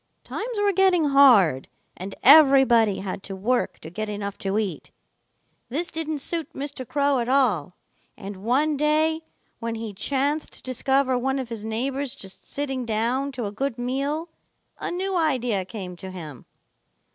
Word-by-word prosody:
Times 460 +1 -5
were 410 -1 +2
getting 360 -5 +3
hard, 225 - +5 0.3
and 190 +2 -7
everybody 265 -8 +6
had 195 0 -5
to 195 0 -7
work 240 +6 0
to 160 - -9
get 215 +4 -4
enough 200 -1 -4
to 195 +1 -1
eat. 200 -7 -3 0.8
This 320 +8 -2
didn't 315 -1 -3
suit 330 +2 -3
Mr. 275 -2 -5
Crow 280 0 +1
at 235 0 -2
all, 215 - +2 0.4
and 195 0 -8
one 270 +9 +1
day 310 +2 +2 0.4
when 230 0 -3
he 220 -2 -5
chanced 280 +8 -1
to - - -11
discover 260 0 +1
one 265 +2 0
of 260 -3 -4
his 225 -3 -5
neighbors 260 +5 -2
just 190 -6 -10
sitting 270 -3 -2
down 240 +5 0
to 245 -3 -4
a 200 - -3
good 260 +3 -3
meal, 280 +7 -2 0.5
a - - -3
new 375 +2 -2
idea 250 - +1
came 185 -2 -7
to 190 - -8
him. 155 -9 -9
255 Hz, 160 wpm, -24 LUFS, 210-285 Hz, 0.8 s, everybody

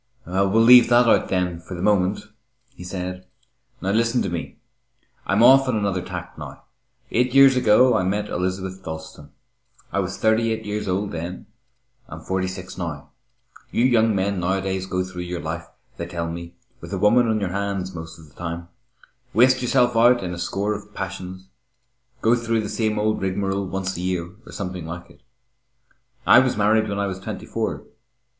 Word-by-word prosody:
"We'll 95 +2 +1
leave 120 +2 +7
that 120 0 +5
out, - - +4
then, 90 -2 -1
for 90 +2 -9
the 85 - -6
moment," 100 -1 +2 0.5
he 90 - -11
said. 90 0 -6 0.5
"Now 95 - -1
listen 115 +3 +2
to - - -3
me. 85 -1 -5 0.7
I'm 105 +4 +3
off 135 +2 +7
on 125 - +1
another 100 -3 -1
tack - - -8
now. - - -9 0.5
Eight 125 +2 +1
years 135 -1 +8
ago 125 +1 +5
I 110 - +2
met 100 +3 -1
Elizabeth 95 +1 -3
Dalstan. 80 -3 -8 0.6
I 100 - +1
was 95 +1 -3
thirty 110 +2 +2
eight 110 0 -3
years 105 0 -3
old 95 +2 -1
then 85 +2 -6 0.6
I - - -7
am - - -11
forty 95 0 -1
six 95 0 -8
now. 80 -5 -5 0.6
You 120 - +1
young 115 -4 +3
men 95 0 0
nowadays 95 +1 -1
go 90 -1 -1
through 90 -1 -7
your 90 0 -4
life, 80 +1 -5 0.3
they 85 - -5
tell 85 -1 -4
me, 85 +1 -8 0.2
with - - -10
a - - -1
woman 115 +3 +4
on 110 -1 +1
your 95 -3 -2
hands 100 -1 -3
most 80 -1 -8
of 80 -2 -15
the 75 - -22
time, 85 +1 -6 0.7
waste 130 +3 +5
yourself 125 -1 +2
out 120 0 +5
in 90 -1 -3
a 85 - -6
score 100 +4 -1
of 105 0 -9
passions, 95 -1 -6 0.8
go 115 - +4
through 115 -1 0
the 105 - -5
same 110 -2 -1
old 110 +1 0
rigmarole 95 +1 -1
once 95 0 -3
a 85 - -5
year 90 -1 -2 0.2
or - - -10
something 90 -4 -5
like 90 +2 -8
it. - - -21 1.0
I - - +8
was 130 -4 +1
married 110 +1 +2
when 100 - -3
I 100 - 0
was 95 -1 -4
twenty 95 - -7
four. - - -3
95 Hz, 190 wpm, -23 LUFS, 90-110 Hz, 1.0 s, years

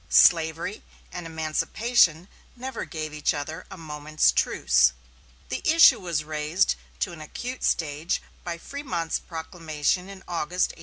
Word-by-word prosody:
Slavery 165 +4 +4 0.3
and 175 -2 -6
emancipation 165 +3 +2 0.3
never 255 0 -5
gave 155 -3 -5
each 150 0 0
other 155 +4 -5
a 190 - -9
moment's 155 -1 +1
truce. 60 0 +3 0.6
The - - -3
issue 325 +1 +7
was 170 -4 -2
raised 155 +4 +1 0.3
to 185 - 0
an 170 -2 -10
acute 245 +11 -6
stage 155 +1 0 0.2
by 170 -1 -4
Frémont's 175 - -3
proclamation 165 +1 -2
in 195 -1 -10
August, 175 +1 0
1861. - - -18
165 Hz, 135 wpm, -26 LUFS, 155-185 Hz, 0.6 s, issue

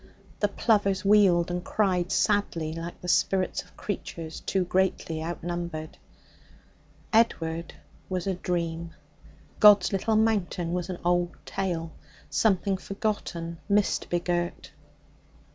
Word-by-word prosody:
The 205 - +3
plovers 200 -3 +1
wheeled 190 -4 +5
and 175 0 -2
cried 185 -4 0
sadly 175 -7 +1
like 165 +1 -6
the 180 - -7
spirits 185 +1 +1
of - - -21
creatures 165 -5 -5
too 190 -1 0
greatly 175 -3 0
outnumbered. 170 -1 -4 1.2
Edward 170 -7 +1 0.3
was 185 -2 -2
a 195 - 0
dream; 170 -2 -3 0.6
God's 205 -3 +7
Little 215 +3 +1
Mountain 200 -6 +1
was 180 0 -2
an 180 - -3
old 175 0 +1
tale 170 -4 -3 0.4
something 195 -2 +2
forgotten, 185 -5 -3
mist 205 0 +1
begirt. 175 0 -2
180 Hz, 110 wpm, -27 LUFS, 170-200 Hz, 1.2 s, God's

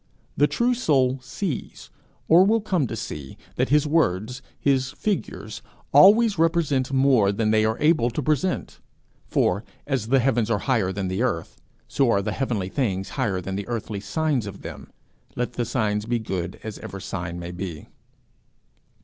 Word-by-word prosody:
The 145 - +4
true 235 - +1
soul 135 - +2
sees, 135 +5 -5 0.4
or 170 +3 +7
will 220 +4 +3
come 180 -9 0
to 115 - -5
see, 75 -11 -7 0.2
that - - 0
his 150 +1 +4
words, 125 - 0 0.2
his 135 -1 +1
figures 205 +5 -3 0.3
always 210 -1 +6
represent 160 -6 +1
more 130 -7 +4
than 110 +1 0
they 110 0 +3
are 110 0 0
able 150 -6 +3
to 130 +5 -3
present; 155 +6 -1 0.5
for, 100 +5 +1 0.2
as 130 -6 -1
the 135 +3 +4
heavens 120 -3 +1
are 115 - +2
higher 110 -9 +1
than 95 0 -3
the 95 +4 -2
earth, 85 -10 -2 0.3
so 135 -3 +2
are 100 -3 +2
the 105 - -2
heavenly 110 -6 -2
things 95 -6 -1
higher 105 -9 -1
than 95 +1 -4
the 100 0 -4
earthly 110 -3 -4
signs 130 +3 -1
of 100 -1 -9
them, - - -8 0.5
let 125 0 -2
the 120 - -2
signs 105 -3 -1
be 120 0 +1
good 95 -5 -4
as 110 -2 -6
ever 95 - -7
sign 85 -3 -5
may 85 0 -6
be. 90 -3 -6
120 Hz, 170 wpm, -24 LUFS, 100-145 Hz, 0.5 s, or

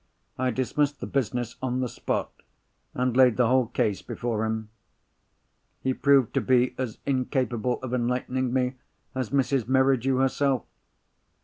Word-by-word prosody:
I 130 0 0
dismissed 140 +4 0
the - - -4
business 120 -2 -2
on 130 -1 -1
the 130 - 0
spot, - - -3 0.6
and 125 -1 0
laid 125 -3 +5
the 125 - +4
whole 125 0 +3
case 115 -4 0
before 115 -2 -2
him. 110 -1 -3 1.1
He 130 - +1
proved 135 -3 +3
to - - +1
be 125 -1 +3
as 125 -4 -3
incapable 125 -3 0
of 130 -1 -4
enlightening 125 +1 -1
me 130 0 0 0.4
as 130 -3 -2
Mrs. 135 -3 +1
Merridew 130 0 +3
herself. 135 0 +1
125 Hz, 140 wpm, -26 LUFS, 120-130 Hz, 1.1 s, laid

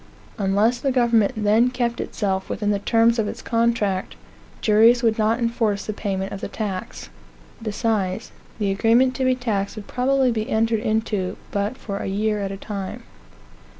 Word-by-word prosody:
Unless 205 +5 +2
the 270 +2 0
government 235 -4 +3
then 220 +3 +3
kept 240 -2 -1
itself 190 -3 -2
within 210 -1 -1
the 200 - 0
terms 230 +2 +3
of 215 - +1
its - - -6
contract, 230 -5 0 0.4
juries 230 +3 +5
would 225 -1 +2
not 220 +1 +2
enforce 230 -4 0
the 215 - -3
payment 195 -2 -3
of 200 - -6
the - - -3
tax. 195 - -5 0.5
Besides, 210 -4 -1 0.3
the 205 -3 0
agreement 230 +6 +3
to 260 - 0
be 255 0 +3
taxed 210 -6 -2
would 215 -2 -8
probably 260 0 +1
be 220 -2 -2
entered 225 0 +1
into 215 -4 -1
but 205 +5 -2
for 200 -6 -5
a - - -4
year 210 +2 0
at 200 -1 -2
a 195 - -5
time. 205 +3 -6
220 Hz, 170 wpm, -22 LUFS, 200-235 Hz, 0.5 s, juries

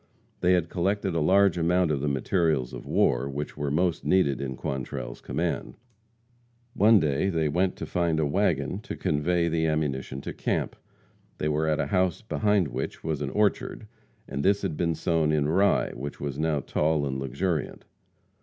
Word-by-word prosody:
They 90 +1 +3
had 90 -3 +2
collected 95 +2 -1
a 85 - +1
large 95 +2 +4
amount 85 0 +2
of 70 -3 -1
the 75 - -1
materials 70 -1 0
of - - -8
war 65 +3 +2
which 70 +2 -5
were 75 -1 -2
most 85 +4 0
needed 70 -9 +2
in 65 -1 -4
Quantrell's 65 -2 -5
command. - - -3 1.0
One 105 +2 +6
day 75 +3 +1
they 80 -4 0
went 90 +5 +1
to - - -6
find 85 -3 0
a 80 - +2
wagon 85 0 0
to 120 - -7
convey 85 +3 +1
the 80 0 +1
ammunition 70 -4 -2
to - - -6
camp. - - -2 0.6
They 75 - -1
were 75 +1 0
at 75 0 +1
a - - +1
house 95 0 0
behind 105 -6 +1
which 65 +2 -5
was 80 -3 -2
an - - -2
orchard, 105 +1 0 0.4
and 70 +1 -3
this 100 +1 +2
had 80 - -1
been 85 0 0
sown 80 -1 +1
in 75 -2 +1
rye 95 +6 +2
which 70 +4 -7
was 70 -1 -4
now 80 -2 +1
tall 75 +2 0
and 65 -1 -3
luxuriant. 70 +5 -2
80 Hz, 180 wpm, -27 LUFS, 70-90 Hz, 1.0 s, One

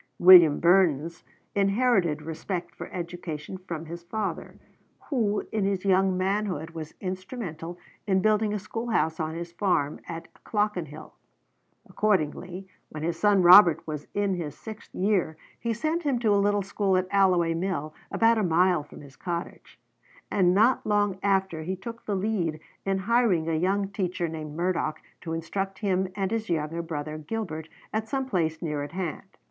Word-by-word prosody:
William 175 -5 +8
Burness 170 -3 +3 0.3
inherited 195 -6 +2
respect 170 +3 -4
for - - -9
education 175 -1 -6
from 165 -2 -5
his 170 +2 -7
father, 200 +4 -4 0.5
who 215 -6 0
in 215 -2 0
his 195 -1 -1
young 190 -1 +3
manhood 185 -4 -1
was 160 -2 -8
instrumental 185 -3 -5 0.3
in 190 -1 +3
building 215 +1 +2
a 210 - -1
schoolhouse 210 -5 -1
on 160 0 -2
his 170 0 -6
farm 170 -6 0
at 165 -1 -6 0.2
Clockenhill. 180 -8 -2 0.7
Accordingly, 185 -1 -1 0.2
when 155 0 -7
his 165 0 -2
son 205 -3 +4
Robert 175 -2 +8
was 150 -2 -5
in 200 -1 +1
his 160 -5 -5
sixth 220 -1 -10
year 185 -5 +1 0.2
he 235 - -2
sent 310 +9 -1
him 285 -6 0
to 225 -3 +2
a 200 - +3
little 205 0 +2
school 195 -1 +1
at 185 - +1
Alloway 180 -4 +3
Mill, 165 -3 -2 0.2
about 230 0 +3
a - - +1
mile 175 -1 +3
from 145 - -13
his 140 -2 -14
cottage; 170 +1 -6 0.5
and 180 -2 +3
not 225 +6 +4
long 205 -2 +1
after 190 -4 +1
he 185 +4 -3
took 230 +5 -9
the 205 - 0
lead 185 -6 -1 0.3
in 195 0 +2
hiring 200 -5 +2
a 165 - 0
young 195 +5 +1
teacher 185 -3 -2
named 155 -2 -6
Murdoch 170 -3 -1 0.2
to 165 - -5
instruct 195 +4 -3
him 190 -3 0
and 195 -2 -1
his 225 -2 -2
younger 165 0 -1
brother 155 -2 -5
Gilbert 160 -3 -5 0.2
at 220 +1 -1
some 270 -1 -1
place 165 -8 -1
near 150 -3 -2
at 145 +3 -6
hand. 185 +1 -5
185 Hz, 165 wpm, -27 LUFS, 165-205 Hz, 0.7 s, William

